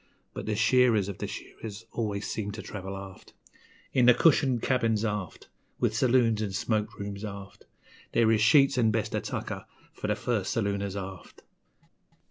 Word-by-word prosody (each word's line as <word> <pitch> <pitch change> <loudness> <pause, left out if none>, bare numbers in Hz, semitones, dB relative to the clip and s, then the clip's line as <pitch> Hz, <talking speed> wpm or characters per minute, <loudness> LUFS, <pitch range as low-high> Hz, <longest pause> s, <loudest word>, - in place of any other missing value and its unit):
But - - -6
the 105 - 0
shearers 110 -2 +3
of 100 - -7
the - - -3
shearers 110 0 -8
always 105 -3 -2
seem 105 -2 -3
to 110 - -7
travel 95 -1 -6
aft; 95 -1 -11 0.6
In 125 -2 +4
the 125 - +8
cushioned 135 -6 +3
cabins, 115 -4 +1
aft, 105 -4 -4 0.3
With - - +1
saloons 120 -4 +3
'n' 100 -3 -2
smoke 110 +2 -1
rooms, 100 0 -5
aft 100 -2 -8 0.5
There 115 -1 +4
is 110 -1 +3
sheets 135 +3 +5
'n' 115 -2 +4
best 110 -1 -1
of - - 0
tucker - - -5 0.3
for - - -5
the 105 - +1
first 110 -2 -1
salooners, 100 -2 -1
aft. 95 -1 -8
110 Hz, 165 wpm, -28 LUFS, 100-115 Hz, 0.6 s, the